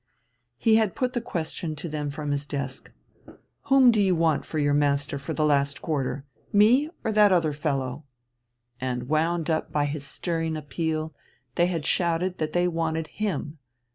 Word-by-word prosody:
He 220 -1 +4
had 220 -4 +1
put 255 -1 -1
the 240 - -1
question 165 -5 -4
to 150 - -6
them 150 -2 -3
from 145 0 -4
his 145 0 -2
desk 140 -2 -5 0.8
Whom 270 -3 +6
do 215 -2 +2
you 190 -2 +3
want 160 -3 +1
for 155 - -5
your 145 -1 +2
master 145 -1 +1
for 145 +3 -5
the 155 - +1
last 140 -1 +2
quarter, 135 -3 -2 0.3
me 240 +9 +5
or 220 - 0
that 210 -1 +5
other 165 -5 +2
fellow? 140 -2 -2 0.8
And, 125 -1 -3
wound 160 +1 +1
up 160 - -1
by 145 -1 +1
his 145 0 -4
stirring 165 +1 -2
appeal, 155 +1 -3 0.4
they 175 0 +3
had 165 -5 -2
shouted 175 +1 0
that 155 -1 -2
they 175 0 +2
wanted 160 -2 -2
him. 160 -7 -2
155 Hz, 170 wpm, -26 LUFS, 145-175 Hz, 0.8 s, Whom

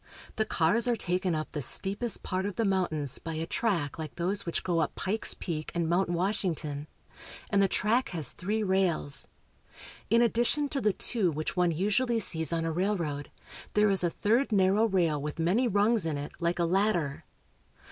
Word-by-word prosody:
The 220 - 0
cars 210 +7 +2
are 240 - +2
taken 180 -3 -1
up 155 0 -4
the 150 - -4
steepest 200 - +1
part 185 +1 -2
of 205 - -5
the 230 - 0
mountains 160 -8 0
by 165 -1 -6
a 160 +1 -2
track 170 - -1
like 155 -2 -6
those 185 +2 -2
which 170 - -1
go 175 -2 0
up 155 - -1
Pikes 210 +4 0
Peak 155 -4 -4
and 170 -1 0
Mount 175 +2 +1
Wash 185 +5 0
ington, 150 -5 -3 0.6
and 200 -1 +3
the 195 - +4
track 225 +6 +1
has 160 -7 +1
three 215 +4 -2
rails. 185 -7 +1 0.8
In 230 +3 +4
addition 240 +5 +1
to 275 - -2
the 210 -2 +2
two, 210 -4 +1
which 155 0 -3
one 180 -1 +2
usually 210 +8 +1
sees 160 -6 +1
on 165 -1 -1
a 165 - -1
railroad, 165 -5 -2 0.5
there 210 -1 +4
is 190 -2 +3
a 175 - +2
third 230 +9 +1
narrow 200 +2 +3
rail 170 -7 +1
with 150 +2 -5
many 185 +10 +2
rungs 210 -2 +2
in 155 -3 -2
it, 145 +1 -6
like 170 0 0
a 170 - +1
ladder. 175 -5 0
185 Hz, 190 wpm, -29 LUFS, 165-210 Hz, 0.8 s, the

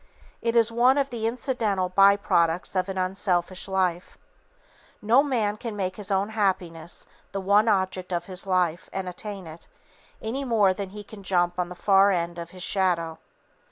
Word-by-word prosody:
It 230 0 0
is 230 -1 +4
one 245 +4 +4
of 275 -1 0
the 225 -2 -2
incidental 225 -6 -1
by 195 +2 +6
products 170 -3 0
of 185 +1 0
an 190 - -4
unselfish 185 -1 -1
life. 185 -2 -1 0.8
No 230 +6 +4
man 225 -8 0
can 225 -1 -6
make 185 -2 -3
his 205 -2 -6
own 195 +1 +1
happiness 180 -6 -2 0.3
the 195 - -2
one 200 +3 +3
object 190 -3 0
of 175 -1 -1
his 190 0 -4
life 180 -3 0
and 190 -1 -4
attain 195 +1 -6
it, 160 +1 -11 0.5
any 245 +6 -3
more 215 -7 +3
than 195 0 -5
he 210 +2 -9
can 205 0 -12
jump 175 -2 0
on 175 -1 -1
the 180 - -8
far 195 +1 +4
end 175 -2 -1
of 170 0 -7
his 185 0 -8
shadow. 175 -4 0
195 Hz, 180 wpm, -25 LUFS, 180-210 Hz, 0.8 s, by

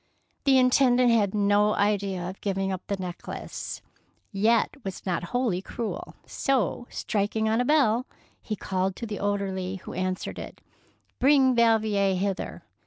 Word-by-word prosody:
The 270 -1 +5
Intendant 255 -1 +4
had 210 -3 +2
no 205 +1 +3
idea 200 -3 0
of 190 +2 -8
giving 195 -1 -1
up 185 -1 -3
the 200 - -1
necklace, 180 -2 -6 0.5
yet 220 +5 +2
was 195 -1 -6
not 175 -2 -1
wholly 230 -3 0
cruel; 225 +3 -5
so, 245 -2 -1
striking 215 +1 -1
on 220 +2 +2
a - - 0
bell, 255 -4 +3 0.3
he 215 - -4
called 190 -1 -2
to 235 - -5
the 210 -2 -5
orderly 195 -2 -2
who 190 - -9
answered 185 0 -3
it, - - -9 0.2
— - - -35
" - - -43
Bring 270 -1 +5
Valvier 215 -4 +3
hither." 195 +1 -3
205 Hz, 155 wpm, -26 LUFS, 190-235 Hz, 0.5 s, The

